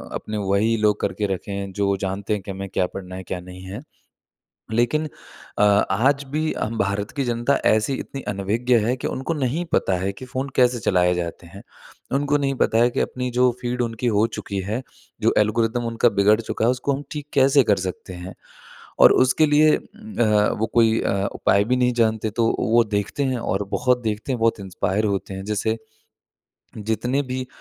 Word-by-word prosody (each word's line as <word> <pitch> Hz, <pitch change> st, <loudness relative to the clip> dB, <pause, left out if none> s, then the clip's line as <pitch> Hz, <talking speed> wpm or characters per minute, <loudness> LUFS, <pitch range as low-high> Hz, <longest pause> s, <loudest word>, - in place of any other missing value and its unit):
अपने 105 Hz, 0 st, -4 dB
वही 110 Hz, +3 st, +2 dB
लोग 105 Hz, -1 st, +2 dB
करके 105 Hz, -, -1 dB
रखे 95 Hz, +2 st, -6 dB
हैं 100 Hz, 0 st, -4 dB
जो 100 Hz, 0 st, +1 dB
जानते 95 Hz, +2 st, -3 dB
हैं 105 Hz, -, -2 dB
कि 100 Hz, -, -7 dB
हमें 95 Hz, 0 st, -6 dB
क्या 90 Hz, -, +1 dB
पढ़ना 95 Hz, -1 st, -7 dB
है 95 Hz, -, -7 dB
क्या 90 Hz, -, -5 dB
नहीं 90 Hz, +1 st, -11 dB
है। 95 Hz, +2 st, -7 dB, 0.9 s
लेकिन 120 Hz, +7 st, +1 dB, 0.5 s
अ, -, -, +3 dB
आज 105 Hz, +7 st, +3 dB
भी 155 Hz, +1 st, 0 dB
हम 115 Hz, +1 st, -2 dB
भारत 100 Hz, 0 st, -1 dB
की 140 Hz, -, +1 dB
जनता 120 Hz, +3 st, +1 dB
ऐसी 110 Hz, +5 st, +3 dB
इतनी 135 Hz, -, -7 dB
अनभिज्ञ 105 Hz, +5 st, 0 dB
है 120 Hz, +3 st, +1 dB
कि -, -, +1 dB
उनको 135 Hz, +6 st, -3 dB
नहीं 145 Hz, +2 st, -1 dB
पता 95 Hz, -, +2 dB
है 95 Hz, +2 st, -2 dB
कि 130 Hz, -, -10 dB
फ़ोन 130 Hz, +2 st, -4 dB
कैसे 125 Hz, -1 st, +3 dB
चलाए 90 Hz, -4 st, +2 dB
जाते 85 Hz, 0 st, -5 dB
हैं। 95 Hz, +4 st, -12 dB, 0.5 s
उनको 145 Hz, +1 st, +2 dB
नहीं 135 Hz, -1 st, -1 dB
पता 110 Hz, -, +1 dB
है 120 Hz, +1 st, +5 dB
कि -, -, -2 dB
अपनी 125 Hz, 0 st, -2 dB
जो 125 Hz, 0 st, +5 dB
फ़ीड 125 Hz, 0 st, -2 dB
उनकी 115 Hz, +1 st, -2 dB
हो 105 Hz, -, +4 dB
चुकी 100 Hz, -1 st, -4 dB
है 105 Hz, +6 st, -3 dB, 0.4 s
जो -, -, +3 dB
एल्गोरिदम 115 Hz, +3 st, +1 dB
उनका 115 Hz, +1 st, +2 dB
बिगड़ 105 Hz, +2 st, +5 dB
चुका 110 Hz, 0 st, -2 dB
है 120 Hz, -, +4 dB
उसको 130 Hz, +3 st, -1 dB
हम 140 Hz, +2 st, -4 dB
ठीक 150 Hz, -1 st, -6 dB
कैसे 135 Hz, 0 st, +5 dB
कर 105 Hz, -4 st, +2 dB
सकते 90 Hz, +1 st, -7 dB
हैं? 90 Hz, +1 st, -8 dB, 0.7 s
और -, -, +8 dB
उसके 130 Hz, +5 st, +4 dB
लिए 150 Hz, +1 st, +5 dB
अ, -, -, -4 dB, 0.8 s
वो 110 Hz, -, +1 dB
कोई 115 Hz, -1 st, +4 dB
अ, 100 Hz, 0 st, 0 dB
उपाय 100 Hz, -, +2 dB
भी 125 Hz, +3 st, +1 dB
नहीं 125 Hz, 0 st, +2 dB
जानते, 110 Hz, -2 st, +1 dB
तो 115 Hz, +2 st, +1 dB
वो 115 Hz, +1 st, +3 dB
देखते 100 Hz, +8 st, -1 dB
हैं 130 Hz, -2 st, 0 dB
और 100 Hz, -3 st, -1 dB
बहुत 125 Hz, 0 st, +1 dB
देखते 110 Hz, +3 st, -3 dB
हैं 125 Hz, -, -2 dB
बहुत 115 Hz, -1 st, +2 dB
इंस्पायर 95 Hz, +2 st, -1 dB
होते 100 Hz, -1 st, -2 dB
हैं। 95 Hz, 0 st, -6 dB
जैसे 105 Hz, +2 st, -1 dB, 1.0 s
जितने 110 Hz, +6 st, -1 dB
भी 130 Hz, 0 st, -3 dB
110 Hz, 200 wpm, -22 LUFS, 100-125 Hz, 1.0 s, और